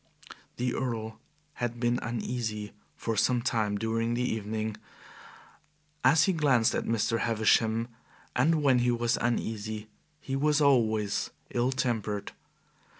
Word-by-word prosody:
The 125 0 -1
Earl 110 -3 -3 0.4
had 120 -1 -2
been 120 +1 +1
uneasy 115 -3 -3 0.2
for 115 - -3
some 120 +3 +2
time 110 -5 0
during 115 +2 -1
the 125 - 0
evening, 110 -2 -2 1.3
as 160 - +6
he 190 - +2
glanced 135 -8 +3
at - - -1
Mr. 115 0 +1
Havisham, 115 0 +2 0.5
and 155 +4 +3
when 130 -3 +4
he 120 0 +2
was 120 0 +1
uneasy 110 -2 -2 0.3
he 135 -2 -4
was 150 +2 +2
always 110 -8 +2 0.2
ill 125 +2 +1
tempered. 115 -6 -2
115 Hz, 125 wpm, -29 LUFS, 110-125 Hz, 1.3 s, as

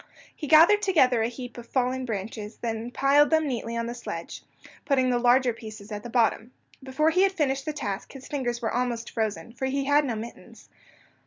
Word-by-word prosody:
He 300 - -6
gathered 335 +8 +7
together 265 - +3
a 225 - +1
heap 245 0 -8
of 235 - -11
fallen 255 0 -1
branches, 215 0 -5
and 225 -1 -2
then - - -6
piled 280 +3 +4
them 315 -1 +2
neatly 235 -3 -3
on 230 - -1
the 235 - -4
sledge, 245 - -7 0.4
putting 260 -3 +2
the 245 - +1
larger 245 0 +4
pieces 215 -1 -10
at 210 0 -4
the 240 - -8
bottom. 230 0 +1 0.3
Before 270 +4 +1
he 365 +3 +2
had 390 0 +3
finished 275 -6 -1
the 310 - -1
task 205 -8 -5
his 270 -2 -10
fingers 245 -4 -3
were 225 - -1
almost 240 -2 -2
frozen, 215 -3 -3
for 265 +2 -3
he 275 +1 -1
had 290 +1 +4
no 250 -5 -2
mittens. 225 +2 -10
250 Hz, 210 wpm, -26 LUFS, 230-275 Hz, 0.4 s, gathered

